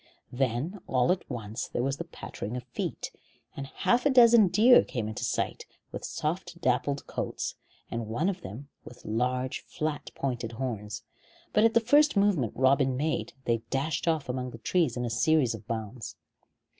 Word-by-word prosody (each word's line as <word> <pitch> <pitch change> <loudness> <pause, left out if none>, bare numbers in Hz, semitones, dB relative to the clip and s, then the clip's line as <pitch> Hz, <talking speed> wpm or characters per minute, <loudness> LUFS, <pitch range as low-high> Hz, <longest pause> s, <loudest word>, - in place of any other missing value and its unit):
Then 135 - -1
all 125 +3 +3
at 180 - -2
once 110 -4 -4
there 120 - -2
was 135 +1 -1
the - - -5
pattering 115 +5 -6
of 125 - -6
feet, 120 -1 -4 0.4
and 135 -1 -5
half 240 - +1
a 290 - +4
dozen 235 -5 +7
deer 220 +7 +7
came 115 -4 -3
into 110 - -5
sight, - - -2 0.2
with - - -6
soft 170 +2 -3
dappled 140 -1 0
coats, - - -3 0.4
and 115 -1 -3
one 120 - 0
of 190 -2 -2
them 130 - -8
with 125 - -13
large 125 +3 -1
flat 155 -1 -3
pointed 120 -4 -3
horns; 110 -3 -4 0.5
but 210 - +5
at 225 - +3
the - - +8
first 290 +3 +4
movement 195 - +2
Robin 130 0 +3
made 155 +3 -1
they 115 -1 +2
dashed 150 +5 -1
off 160 -3 +1
among 125 0 -3
the 115 - -9
trees 145 +1 +1
in 120 - -1
a - - -2
series 145 0 +3
of 110 -1 -9
bounds. 110 0 -5
135 Hz, 175 wpm, -29 LUFS, 120-175 Hz, 0.5 s, the